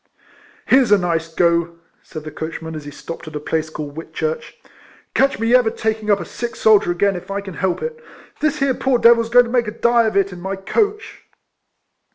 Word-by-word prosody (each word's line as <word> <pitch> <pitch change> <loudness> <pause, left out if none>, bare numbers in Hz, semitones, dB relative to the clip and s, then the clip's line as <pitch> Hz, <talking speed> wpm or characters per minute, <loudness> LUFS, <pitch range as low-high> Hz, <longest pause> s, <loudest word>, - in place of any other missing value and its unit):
" - - -29
Here 265 +1 +7
's 235 - -3
a 205 - +7
nice 165 -3 -1
go," 170 0 +1 0.2
said 155 - -9
the 155 - -7
coachman, 160 +1 -6
as 155 -2 -7
he - - -6
stopped 165 +3 -9
at 155 - -9
a - - -2
place 160 +1 -2
called 150 -2 -7
Whitchurch, 470 - -4 0.3
" - - -28
catch 270 +1 +2
me 230 +2 +1
ever 250 -3 +5
taking 220 -1 -3
up 200 -1 +4
a - - -5
sick 240 -1 -6
soldier 215 -4 +4
again 195 +3 +1
if 175 - -8
I 200 0 -2
can 195 -2 -8
help 185 0 -2
it. 475 0 -6 0.4
This 305 -1 0
here 275 -1 +1
poor 265 0 +1
devil 235 0 +5
's 230 - -8
going 245 +1 +6
to 235 - -7
make 240 -2 +1
a - - -2
die 235 -1 +3
of 215 - -1
it 195 -1 +1
in 175 - -10
my 190 +2 -3
coach." 415 - -2
200 Hz, 230 wpm, -19 LUFS, 170-240 Hz, 0.4 s, Here